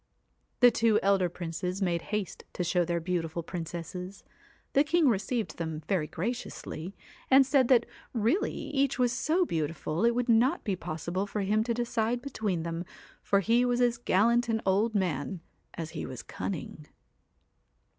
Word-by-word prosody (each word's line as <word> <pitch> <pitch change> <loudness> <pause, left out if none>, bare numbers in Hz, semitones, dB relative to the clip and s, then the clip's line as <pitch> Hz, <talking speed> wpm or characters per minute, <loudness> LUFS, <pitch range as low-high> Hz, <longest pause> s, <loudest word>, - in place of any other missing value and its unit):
The 245 -1 +8
two 225 -1 +3
elder 195 -2 +3
princes 180 +2 -4
made 175 -4 0
haste 210 -4 -3
to 180 - -2
show 175 +1 +2
their 170 0 -1
beautiful 170 -1 -2
princesses. 175 +3 -6 0.5
The 280 - +5
king 320 0 +3
received 225 +1 0
them 160 -2 -4
very 180 -6 +1
graciously, 195 -3 -5 0.3
and 270 0 +7
said 270 -2 +3
that 240 -3 +5 0.3
really 245 - +1
each 275 -1 -1
was 250 -2 +2
so 315 +10 +1
beautiful 160 - -2
it 235 0 +4
would 245 0 0
not 235 +3 +3
be 200 -4 -1
possible 175 +3 -3
for 205 +1 -3
him 210 +3 +2
to 235 -1 0
decide 240 0 0
between 215 -10 -2
them, 165 +1 -3 0.4
for 200 0 +2
he 230 +4 +3
was 245 0 +1
as 240 -1 +2
gallant 235 +3 +3
an 225 0 +1
old 205 +4 +2
man 175 -2 -1 0.4
as 160 -2 -5
he 160 - -5
was 130 -3 -7
cunning. 155 -4 -6
200 Hz, 160 wpm, -29 LUFS, 170-240 Hz, 0.5 s, The